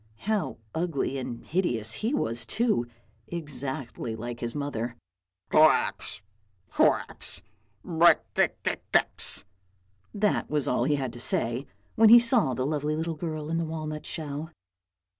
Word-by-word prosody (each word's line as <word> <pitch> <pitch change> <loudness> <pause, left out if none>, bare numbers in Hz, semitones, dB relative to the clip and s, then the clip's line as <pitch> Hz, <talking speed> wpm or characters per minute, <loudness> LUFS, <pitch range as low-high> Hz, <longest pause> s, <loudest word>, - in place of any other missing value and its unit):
how 215 -2 0 0.2
ugly 160 -5 -1
and 120 -2 -6
hideous 120 - 0
he 220 - -2
was 115 - 0
too, 215 - 0 0.4
exactly 135 -7 -5
like 120 +1 -6
his 120 +2 -3
mother. 125 -5 -3 0.3
" 90 +1 -49
Koax, 155 -8 +3 0.5
koax, - - +1 0.4
brekke 170 0 +4
ke - - 0
kex, - - +1 0.7
that 210 0 0
was 150 -2 0
all 125 - +1
he 150 - +2
had 130 -4 -3
to 120 - -9
say 120 +2 0 0.3
when 220 0 +6
he 235 - +11
saw 230 - +3
the 130 - -1
lovely 150 +1 -1
little 165 +1 -2
girl 155 -1 -4
in 165 - +1
the - - 0
walnut 155 -1 -5
shell. 150 0 -5
150 Hz, 140 wpm, -27 LUFS, 120-165 Hz, 0.7 s, he